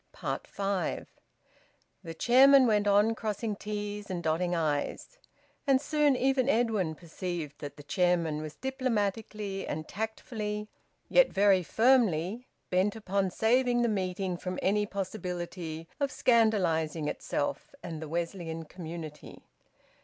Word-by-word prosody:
FIVE. 195 -1 -2 1.0
The 165 -2 -7
chairman 265 +6 +7
went 210 -3 +2
on 205 +2 +4
crossing 215 -1 -3
t's 210 0 -5
and 175 -2 -3
dotting 170 +3 0
i's. 155 - -2 0.5
And 270 -1 +5
soon 295 -1 +2
even 265 0 +2
Edwin 220 - +1
perceived 170 -3 -5
that 145 0 -7
the 145 - -11
chairman 165 -1 +1
was 155 -1 -7
diplomatically 215 - -2
and 155 +1 -4
tactfully, 215 0 -4 0.4
yet - - +5
very 195 -1 +4
firmly, 220 - +2 0.2
bent 185 +3 +2
upon 195 -3 -1
saving 240 +4 +2
the 235 - +2
meeting 185 -2 -2
from 180 +1 -4
any 205 +2 +2
possibility 180 -4 -5
of 280 -1 +1
scandalising 180 -12 +2
itself - - -3
and 160 -1 -6
the 160 - -6
Wesleyan 165 -1 -3
community. 160 -2 -9
195 Hz, 120 wpm, -30 LUFS, 170-225 Hz, 1.0 s, chairman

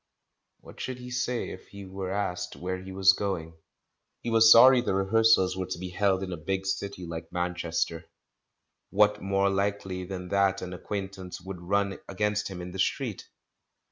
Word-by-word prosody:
What - - -14
should 130 -1 -4
he 125 0 -9
say 125 -1 -2
if - - -10
he 100 -1 -10
were 95 0 -5
asked 95 -3 -2
where 90 +1 -4
he 95 +1 -9
was 95 0 +5
going? 95 -5 -3 0.7
He 120 - -3
was 115 0 +7
sorry 125 +2 +9
the 100 - -1
rehearsals 95 -1 +4
were 95 -1 -3
to - - -4
be 90 +1 -6
held 95 +1 +1
in 95 -1 -4
a - - -5
big 95 +5 -3
city 95 -1 -3
like 80 -1 -7
Manchester; 85 -1 -2 0.8
what 105 +1 +3
more 100 0 +1
likely 95 -2 -1
than 90 -1 -6
that 100 0 +2
an 90 0 -6
acquaintance 95 0 -6
would 95 -1 -8
run 100 +2 0
against 105 +1 0
him 90 -2 -7
in 90 - -7
the 95 - -7
street? - - -1
95 Hz, 175 wpm, -28 LUFS, 90-100 Hz, 0.8 s, sorry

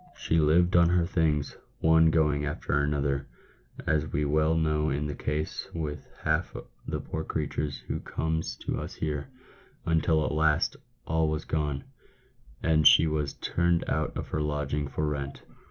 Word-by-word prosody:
She 80 - +1
lived 85 +4 +4
on 85 -1 +6
her 85 -1 +3
things, 80 -5 0 0.2
one 80 0 +5
going 75 -2 +2
after 75 -1 -3
another, 70 -1 0 0.6
as 75 -1 0
we 75 +1 0
well 75 +2 +2
know 75 -1 +1
is 70 +2 -1
the 75 - -3
case 75 +2 -3
with 75 -3 -4 0.2
half - - 0 0.3
the - - -2
poor 80 - -4
creatures 75 -2 -2
who - - -2
comes 80 0 -2
to - - -1
us - - -6
here, 75 - -3 0.6
until 80 -1 +2
at - - -1
last 75 0 +2 0.3
all 80 0 +1
was 75 0 -2
gone, 75 -3 -1 0.8
and 80 -2 +5
she - - +7
was 75 -2 -1
turned 85 0 0
out 75 0 -1
of - - -5
her 75 - -1
lodgings 75 -1 -2
for 75 - -1
rent." 70 -2 -4
75 Hz, 160 wpm, -28 LUFS, 75-80 Hz, 0.8 s, she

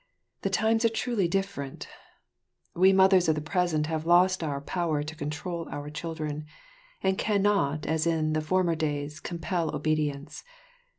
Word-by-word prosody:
The - - 0
times 225 +1 +2
are 230 - +5
truly 225 -4 0
different; 195 -7 -3 0.9
we 185 +2 +5
mothers 190 -2 +5
of 155 - +3
the - - -1
present 155 0 0
have 160 0 -2
lost 180 +1 +4
our 145 -3 -2
power 155 0 -1
to 155 +1 -7
control 160 +3 -4
our 145 +1 -6
children, 155 -1 -5 0.6
and 190 0 +1
cannot 200 -8 +1
as 160 +1 0
in 155 -2 +1
former 175 +2 +1
days 150 -1 -3
compel 170 -1 -2
obedience. 150 -1 -2
160 Hz, 140 wpm, -28 LUFS, 150-185 Hz, 0.9 s, are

